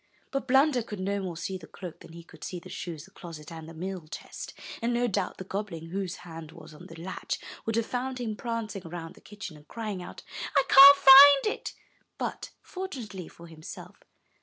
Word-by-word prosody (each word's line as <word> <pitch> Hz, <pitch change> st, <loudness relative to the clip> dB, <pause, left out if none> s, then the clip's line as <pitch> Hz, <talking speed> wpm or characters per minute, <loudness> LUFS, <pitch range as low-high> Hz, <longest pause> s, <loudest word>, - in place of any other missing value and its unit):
But 275 Hz, -1 st, -2 dB
Blunder 270 Hz, 0 st, +4 dB
could 210 Hz, -3 st, -7 dB
no 200 Hz, +2 st, -1 dB
more 180 Hz, -3 st, -5 dB
see 185 Hz, +3 st, -4 dB
the 160 Hz, -, -12 dB
cloak 175 Hz, +2 st, -9 dB
than 165 Hz, -, -14 dB
he 170 Hz, 0 st, -10 dB
could 160 Hz, -, -15 dB
see 180 Hz, -, -5 dB
the -, -, -13 dB
shoes, 165 Hz, -4 st, -6 dB
the 195 Hz, -, -20 dB
closet, 165 Hz, -5 st, -10 dB
and 160 Hz, -1 st, -8 dB
the -, -, -10 dB
meal 180 Hz, -1 st, -5 dB
chest; -, -, -8 dB, 0.2 s
and 235 Hz, +1 st, 0 dB
no 245 Hz, +1 st, +2 dB
doubt 200 Hz, -5 st, -1 dB
the -, -, -6 dB
goblin, 185 Hz, -4 st, -5 dB
whose 190 Hz, -1 st, -3 dB
hand 165 Hz, -2 st, -9 dB
was 155 Hz, -2 st, -13 dB
on 150 Hz, -, -12 dB
the 165 Hz, -, -11 dB
latch, 185 Hz, +3 st, -4 dB, 0.3 s
would 225 Hz, -, 0 dB
have 230 Hz, -1 st, +1 dB
found 255 Hz, +1 st, -3 dB
him 225 Hz, -3 st, -3 dB
prancing 230 Hz, -3 st, -4 dB
around 165 Hz, 0 st, -7 dB
the -, -, -19 dB
kitchen, 200 Hz, -5 st, -9 dB
and 150 Hz, 0 st, -19 dB
crying 215 Hz, -5 st, -5 dB
out, 180 Hz, -, -10 dB, 0.3 s
'1 275 Hz, -, +5 dB
can't 280 Hz, +1 st, +11 dB
find 275 Hz, 0 st, +10 dB
it,'' -, -, -7 dB, 0.4 s
but, -, -, -4 dB
for 380 Hz, 0 st, -5 dB
tunately 210 Hz, -, -7 dB
for 170 Hz, -, -14 dB
himself. 160 Hz, -2 st, -10 dB
190 Hz, 210 wpm, -28 LUFS, 165-235 Hz, 0.4 s, can't